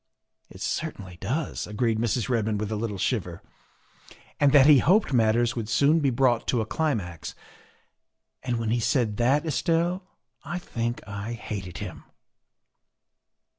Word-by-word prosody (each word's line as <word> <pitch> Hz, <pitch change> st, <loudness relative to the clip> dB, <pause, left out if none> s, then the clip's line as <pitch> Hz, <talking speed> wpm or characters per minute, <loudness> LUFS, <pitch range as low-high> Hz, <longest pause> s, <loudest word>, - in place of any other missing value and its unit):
" -, -, -46 dB
It -, -, -11 dB
certainly 90 Hz, -3 st, -4 dB
does," 135 Hz, +10 st, -3 dB
agreed 110 Hz, +1 st, 0 dB
Mrs. 120 Hz, 0 st, 0 dB
Redmond 110 Hz, -4 st, 0 dB
with 105 Hz, 0 st, -3 dB
a -, -, -1 dB
little 105 Hz, -2 st, -3 dB
shiver. 90 Hz, -5 st, -2 dB, 1.0 s
"And 145 Hz, -1 st, +5 dB
that 140 Hz, -2 st, +7 dB
he 145 Hz, -2 st, +8 dB
hoped 185 Hz, -, +3 dB
matters 115 Hz, 0 st, +3 dB
would 115 Hz, -3 st, -4 dB
soon 140 Hz, +7 st, +4 dB
be 140 Hz, -3 st, +2 dB
brought 120 Hz, -2 st, +2 dB
to 125 Hz, -, +1 dB
a 110 Hz, -, 0 dB
climax. 105 Hz, -, -2 dB, 1.1 s
And 125 Hz, -2 st, -2 dB
when 115 Hz, -1 st, -1 dB
he 120 Hz, -, +2 dB
said 115 Hz, -3 st, +1 dB
that, 135 Hz, +6 st, +2 dB
Estelle, 165 Hz, +5 st, 0 dB, 0.4 s
I 175 Hz, +4 st, -4 dB
think 120 Hz, -10 st, -4 dB
I 100 Hz, +3 st, -5 dB
hated 100 Hz, -5 st, -6 dB
him." -, -, -7 dB
120 Hz, 150 wpm, -26 LUFS, 105-140 Hz, 1.1 s, he